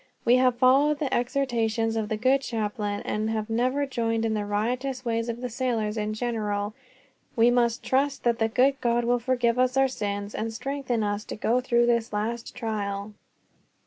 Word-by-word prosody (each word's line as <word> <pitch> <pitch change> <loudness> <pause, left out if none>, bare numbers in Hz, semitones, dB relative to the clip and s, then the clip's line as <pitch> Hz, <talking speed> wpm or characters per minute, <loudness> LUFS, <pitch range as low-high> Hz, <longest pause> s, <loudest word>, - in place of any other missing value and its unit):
We 245 +2 +6
have 255 -1 +3
followed 275 +4 +4
the 285 -3 -2
exhortations 235 -3 0
of 220 -2 -2
the 220 - -1
good 260 +4 +3
chaplain, 210 -4 -3
and 215 +1 -2
have 220 0 -2
never 255 +5 +1
joined 230 -4 -1
in 220 - 0
the 210 -1 -1
riotous 250 +5 -2
ways 230 0 -1
of 235 +1 -4
the 250 - -2
sailors 225 -3 -1
in 215 -1 -2
general. 215 -3 -2 0.6
We 235 0 +5
must 240 0 +1
trust 275 +1 0
that 235 0 +1
the 225 0 +2
good 265 +4 +2
God 240 0 +1
will 245 +1 +2
forgive 245 0 +1
us 255 +1 +2
our 270 0 +5
sins, 205 -4 -4
and 225 +1 -3
strengthen 250 -1 -2
us 205 0 -2
to - - -6
go 235 +4 +1
through 240 -2 +2
this 235 -1 +1
last 225 +3 -3
trial." 210 -3 -3
235 Hz, 185 wpm, -26 LUFS, 220-255 Hz, 0.6 s, We